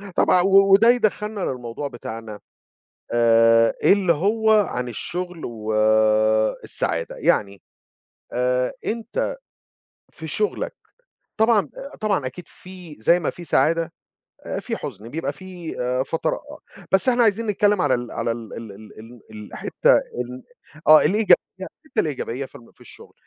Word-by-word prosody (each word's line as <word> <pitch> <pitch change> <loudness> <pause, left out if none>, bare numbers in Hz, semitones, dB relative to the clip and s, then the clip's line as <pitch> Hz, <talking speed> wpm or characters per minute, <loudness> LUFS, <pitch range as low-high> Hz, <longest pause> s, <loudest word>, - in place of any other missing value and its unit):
طبعًا 180 - +4
و 195 +1 +5
وده 225 +4 +6
يدخّلنا 215 -3 +1
للموضوع 125 -2 -4
بتاعنا 115 -4 -8 0.7
آآ، 115 -1 +4
اللي 195 -4 +4
هو 220 +7 +1 0.2
عن 125 0 -3
الشغل 175 - -5
و 110 -2 -5 0.9
السعادة 85 0 -3
يعني 100 -1 0 0.7
آآ، 125 +1 0
أنت 235 - -3 0.8
في - - -9
شغلك 425 - -2 0.6
طبعًا، 220 - +3 0.3
طبعًا 200 -10 0
أكيد 155 +7 -9
فيه 180 -4 -12
زَي 170 +11 +3
ما 160 - -1
فيه 175 - -9
سعادة، 165 +1 +1 0.7
فيه - - -4
حُزن 105 +4 -8
بيبقى 165 +5 -3
فيه 180 -3 -9 0.3
فترا 160 +4 -2 0.5
بس 190 +6 +3
إحنا 245 -1 +4
عايزين 225 0 +2
نتكلّم 205 -1 +2
على 145 -3 +2
ال 120 -1 -4
على 115 0 -1
ال 115 -2 -8
ال 115 -2 -8 0.3
ال 115 +1 -13
الحتّة 105 -1 0
ال 125 +1 -5 0.5
آه 155 0 +10
الإيجابية 205 +6 +5 0.3
الحتّة 260 +9 -4
الإيجابية 135 -3 -3
في - - -28
الم 115 - -15
في - - -33
الشغل، - - -15
160 Hz, 130 wpm, -22 LUFS, 120-195 Hz, 0.9 s, آه